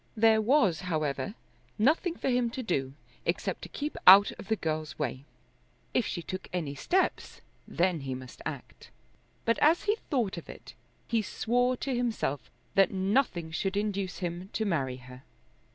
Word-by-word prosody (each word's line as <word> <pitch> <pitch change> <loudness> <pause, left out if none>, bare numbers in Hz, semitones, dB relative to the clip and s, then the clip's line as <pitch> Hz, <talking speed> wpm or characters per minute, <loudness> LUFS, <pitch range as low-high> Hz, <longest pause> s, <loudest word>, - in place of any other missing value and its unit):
There 220 0 +5
was, 215 - +3
however, 160 +3 -2 0.4
nothing 315 - +2
for - - -4
him 245 -1 +2
to 260 - -2
do 135 - -1 0.3
except - - -2
to - - -8
keep 295 +1 -4
out 195 +2 +10
of - - -9
the 220 - +2
girl's 155 -4 -3
way. 135 -2 -3 0.7
If 245 - +2
she 170 - -4
took 185 +1 -6
any 165 -6 -2
steps, 365 - -1 0.3
then 175 -1 +1
he 135 -2 -4
must 130 -1 -10
act. - - -7 0.6
But 230 - +2
as 320 +4 +4
he 420 +1 +1
thought 230 - 0
of 170 - -9
it, - - -11 0.3
he 230 -1 +1
swore 245 +5 0
to 270 - -2
himself 235 - -1 0.2
that 195 -2 +5
nothing 190 -4 0
should 195 +4 -1
induce 200 -3 -2
him 175 +1 -4
to 220 - -1
marry 135 -9 -1
her. 125 0 -12
195 Hz, 165 wpm, -29 LUFS, 160-235 Hz, 0.7 s, out